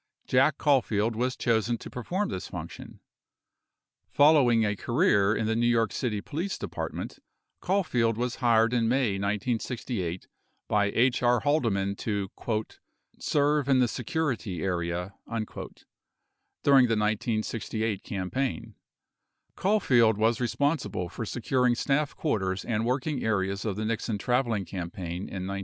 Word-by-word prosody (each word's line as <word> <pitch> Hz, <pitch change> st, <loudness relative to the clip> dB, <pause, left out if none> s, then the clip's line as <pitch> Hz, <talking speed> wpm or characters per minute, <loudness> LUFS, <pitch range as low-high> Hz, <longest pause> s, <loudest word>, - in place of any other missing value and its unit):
Jack 135 Hz, +3 st, +3 dB
Caulfield 115 Hz, -6 st, +2 dB
was 125 Hz, +3 st, -1 dB
chosen 115 Hz, 0 st, +1 dB
to -, -, -10 dB
perform 185 Hz, -, -3 dB
this -, -, -5 dB
function. -, -, -9 dB, 1.1 s
Following 140 Hz, -7 st, +5 dB
a 105 Hz, 0 st, 0 dB
career 110 Hz, -, +2 dB
in 110 Hz, -, -1 dB
the 110 Hz, +1 st, 0 dB
New 120 Hz, +1 st, +2 dB
York 115 Hz, -3 st, +2 dB
City 105 Hz, -5 st, -2 dB
Police 175 Hz, -, -3 dB
Department, -, -, -5 dB, 0.4 s
Caulfield 125 Hz, -, +1 dB
was 125 Hz, 0 st, -2 dB
hired 115 Hz, -1 st, +3 dB
in 115 Hz, -2 st, +2 dB
May 120 Hz, -6 st, +1 dB
1968 105 Hz, -2 st, -2 dB, 0.4 s
by 105 Hz, -1 st, +2 dB
H. 120 Hz, +5 st, +2 dB
R. 120 Hz, -1 st, +3 dB
Halde 145 Hz, -3 st, +2 dB
man 100 Hz, 0 st, -1 dB
to 100 Hz, -3 st, -2 dB, 0.9 s
"serve 145 Hz, -1 st, +1 dB
in 135 Hz, -, +5 dB
the 125 Hz, -1 st, +4 dB
security 120 Hz, -, -2 dB
area," 90 Hz, 0 st, -2 dB
1 115 Hz, -1 st, -3 dB, 1.2 s
during 135 Hz, -3 st, +6 dB
the 115 Hz, -, +1 dB
1968 110 Hz, 0 st, -1 dB
campaign. 115 Hz, +4 st, -3 dB, 0.8 s
Caul 210 Hz, +3 st, +2 dB
field 115 Hz, -, +4 dB
was 115 Hz, +3 st, +2 dB
responsible 120 Hz, -, -1 dB
for 115 Hz, +5 st, -5 dB
securing 125 Hz, +1 st, +1 dB
staff 145 Hz, +3 st, 0 dB
quarters 95 Hz, -, -1 dB
and 115 Hz, 0 st, -1 dB
working 135 Hz, +2 st, -1 dB
areas 100 Hz, -2 st, -1 dB
of 105 Hz, -3 st, -1 dB
the 110 Hz, +2 st, -3 dB
Nixon 115 Hz, -1 st, -1 dB
traveling 120 Hz, -3 st, 0 dB
campaign 90 Hz, 0 st, -5 dB
in 95 Hz, -1 st, -5 dB
1968. 100 Hz, +1 st, -3 dB
115 Hz, 135 wpm, -28 LUFS, 105-130 Hz, 1.2 s, during